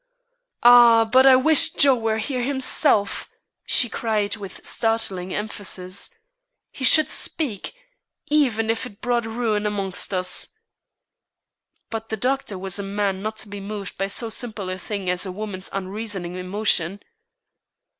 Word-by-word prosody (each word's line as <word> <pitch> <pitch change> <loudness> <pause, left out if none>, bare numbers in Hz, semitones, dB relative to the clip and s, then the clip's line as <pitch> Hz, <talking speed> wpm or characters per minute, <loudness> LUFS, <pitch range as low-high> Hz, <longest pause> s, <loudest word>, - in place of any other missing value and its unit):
"Ah, 240 -1 +8
but 260 +4 +5
I 265 - +8
wish 315 +4 +3
Joe 280 -5 +6
were 225 -3 -1
here 250 +3 -2
himself!" 265 -4 +1 0.4
she 245 - +3
cried 215 -2 -1
with 200 -4 -10
startling 210 -5 -1
emphasis. 200 -3 -4 0.6
"He 265 - -9
should 310 +4 +6
speak, 270 - -2 0.5
even 240 -7 +1
if 230 +3 -3
it 205 -4 -16
brought 240 -2 -1
ruin 220 -2 -1
amongst 195 -3 -1
us." 185 -1 0 1.4
But 225 0 -5
the 220 - -3
doctor 255 -3 -2
was 190 +1 -1
a - - -3
man 195 -1 -2
not 215 +1 -4
to - - -17
be 205 0 -8
moved 200 -1 -7
by 195 - 0
so 225 +3 -2
simple 215 -5 -4
a 185 - -5
thing 200 0 -5
as 180 +2 0
a - - -4
woman's 195 -1 -6
unreasoning 195 -2 -4
emotion. 185 0 -1
215 Hz, 145 wpm, -22 LUFS, 195-240 Hz, 1.4 s, Ah